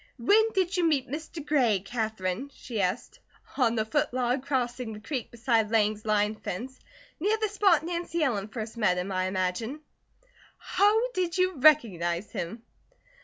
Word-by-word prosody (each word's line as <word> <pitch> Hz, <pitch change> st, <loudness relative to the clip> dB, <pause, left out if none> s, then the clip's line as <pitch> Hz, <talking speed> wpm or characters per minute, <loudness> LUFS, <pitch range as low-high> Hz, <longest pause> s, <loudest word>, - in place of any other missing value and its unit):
"When 425 Hz, -, +4 dB
did 375 Hz, -1 st, +1 dB
you 355 Hz, -, +2 dB
meet 300 Hz, -6 st, +2 dB
Mr. 310 Hz, +2 st, -6 dB
Gray, 250 Hz, -10 st, +3 dB
Katherine?" 220 Hz, +1 st, -3 dB
she 225 Hz, -5 st, -4 dB
asked. 190 Hz, +6 st, -2 dB, 0.4 s
"On 240 Hz, -4 st, +2 dB
the 220 Hz, -1 st, 0 dB
foot 220 Hz, -, 0 dB
log 250 Hz, +1 st, 0 dB
crossing 250 Hz, -4 st, -2 dB
the 210 Hz, -, -8 dB
creek 245 Hz, +2 st, -4 dB
beside 230 Hz, -2 st, +1 dB
Lang's 215 Hz, -1 st, +1 dB
line 210 Hz, 0 st, +2 dB
fence. 235 Hz, +5 st, -6 dB, 0.4 s
Near 415 Hz, +6 st, +1 dB
the 435 Hz, 0 st, 0 dB
spot 390 Hz, -6 st, +3 dB
Nancy 340 Hz, -1 st, -2 dB
Ellen 210 Hz, -8 st, 0 dB
first 220 Hz, +1 st, -6 dB
met 210 Hz, -5 st, +2 dB
him 180 Hz, +2 st, -3 dB
I 185 Hz, 0 st, 0 dB
imagine." 190 Hz, +9 st, -2 dB, 0.8 s
"How 445 Hz, +5 st, +2 dB
did 365 Hz, -4 st, -1 dB
you 370 Hz, 0 st, +2 dB
recognize 205 Hz, -, +3 dB
him?" 225 Hz, +7 st, -5 dB
240 Hz, 160 wpm, -28 LUFS, 215-315 Hz, 0.8 s, When